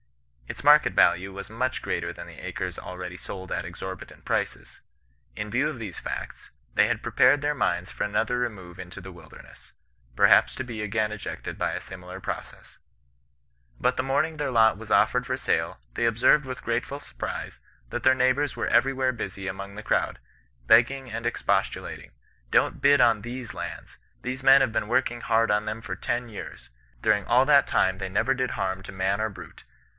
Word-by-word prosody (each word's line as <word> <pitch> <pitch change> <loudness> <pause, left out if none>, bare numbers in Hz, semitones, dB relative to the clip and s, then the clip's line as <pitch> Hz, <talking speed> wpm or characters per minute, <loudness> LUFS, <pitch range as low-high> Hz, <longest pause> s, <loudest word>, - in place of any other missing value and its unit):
Its - - -7
market 150 +1 +6
value 90 +3 +3
was 100 +1 -8
much 125 +3 -2
greater - - -2
than - - -9
the - - -12
acres - - -4
already 90 -1 -7
sold 95 -1 -8
at - - -1
exorbitant 95 0 -8
prices. - - -3 0.5
In 105 - -4
view 130 +7 +2
of 130 - -7
these 105 -6 -6
facts, - - -6 0.2
they - - +4
had - - -2
prepared 145 - +4
their 145 0 +1
minds 90 -9 -1
for - - -3
another 110 +4 0
remove 95 -8 -4
into 90 +1 -8
the 95 +1 -9
wilderness, 80 -3 -15 0.4
perhaps - - +5
to 130 - -3
be 115 -3 -6
again 105 +1 0
ejected 110 -2 -6
by - - 0
a - - -3
similar 90 0 -9
process. - - -7 1.0
But 125 0 +2
the 130 - -1
morning 155 +4 0
their 145 -3 -2
lot 110 -3 +5
was 110 0 -10
offered 125 0 +3
for 130 -2 -2
sale, 95 - -1
they 120 - 0
observed 125 +6 +4
with 130 -1 -6
gratefiu 120 +4 -2
surprise, - - -6 0.3
that - - -3
their 130 0 +6
neighbours 130 +2 +2
were - - -2
everywhere 130 -1 +2
busy 95 -4 -5
among 100 +1 -6
the 110 - -7
crowd, - - 0 0.5
begging 130 - +4
and 115 +1 -5
expostulating: 120 - -1 0.2
* - - -36
Don't - - +2
bid 140 -1 +6
on 115 -4 +4
tJiese 120 +1 -6
lands! - - -7 0.2
These 130 +1 -4
men 135 +1 +8
have 130 -4 +2
been 105 - 0
working 120 -1 +1
hard 115 0 +2
on 105 +1 +1
them 110 +1 -3
for 115 - -5
ten 120 0 -2
years. 105 - -9 0.3
During 105 -1 +3
all 125 +5 +4
that 140 0 +5
time, 95 0 +2
they 95 -1 -3
never 115 +7 +2
did 130 -1 -1
harm 95 -1 -2
to - - -8
man 95 +2 0
or 110 - 0
brute. 100 - -12
115 Hz, 190 wpm, -26 LUFS, 95-130 Hz, 1.0 s, men